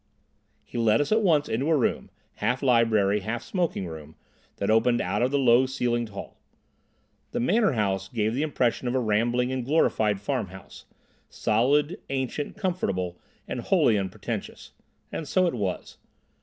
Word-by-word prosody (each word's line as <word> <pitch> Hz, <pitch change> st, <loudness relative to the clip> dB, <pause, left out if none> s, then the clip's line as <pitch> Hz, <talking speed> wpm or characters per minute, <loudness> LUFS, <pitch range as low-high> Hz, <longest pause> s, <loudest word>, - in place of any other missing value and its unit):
He 120 Hz, -, -5 dB
led 110 Hz, -1 st, +3 dB
us 145 Hz, -, -1 dB
at 220 Hz, +1 st, +4 dB
once 160 Hz, -7 st, +3 dB
into 130 Hz, +7 st, -1 dB
a 160 Hz, -, +4 dB
room, 130 Hz, -, -1 dB, 0.3 s
half 125 Hz, +3 st, -1 dB
library, 110 Hz, -5 st, +3 dB
half 115 Hz, +4 st, -4 dB
smoking 170 Hz, -, -2 dB
room, 80 Hz, -2 st, -9 dB, 0.4 s
that 100 Hz, +2 st, -1 dB
opened 120 Hz, +2 st, +3 dB
out 100 Hz, +4 st, -1 dB
of 125 Hz, -, +3 dB
the 140 Hz, -, +1 dB
low 130 Hz, -1 st, +4 dB
ceilinged 120 Hz, -4 st, -1 dB
hall. 100 Hz, -, -9 dB, 0.9 s
The -, -, -1 dB
Manor 205 Hz, -, +2 dB
House 95 Hz, -4 st, -1 dB
gave 110 Hz, +1 st, -1 dB
the 130 Hz, -, -1 dB
impression 130 Hz, -5 st, 0 dB
of 120 Hz, -, -1 dB
a -, -, +3 dB
rambling 120 Hz, +3 st, +1 dB
and 130 Hz, -1 st, -2 dB
glorified 110 Hz, -7 st, +2 dB
farmhouse, 100 Hz, -4 st, -5 dB, 0.4 s
solid, 145 Hz, +9 st, +1 dB
ancient, 135 Hz, +5 st, -3 dB
comfortable, 100 Hz, -, -2 dB, 0.3 s
and -, -, -4 dB
wholly 110 Hz, -, +3 dB
unpretentious. 95 Hz, -2 st, -5 dB, 0.4 s
And 155 Hz, -, -5 dB
so 185 Hz, +5 st, +2 dB
it 175 Hz, -, 0 dB
was. 100 Hz, -6 st, -4 dB
120 Hz, 155 wpm, -26 LUFS, 105-140 Hz, 0.9 s, at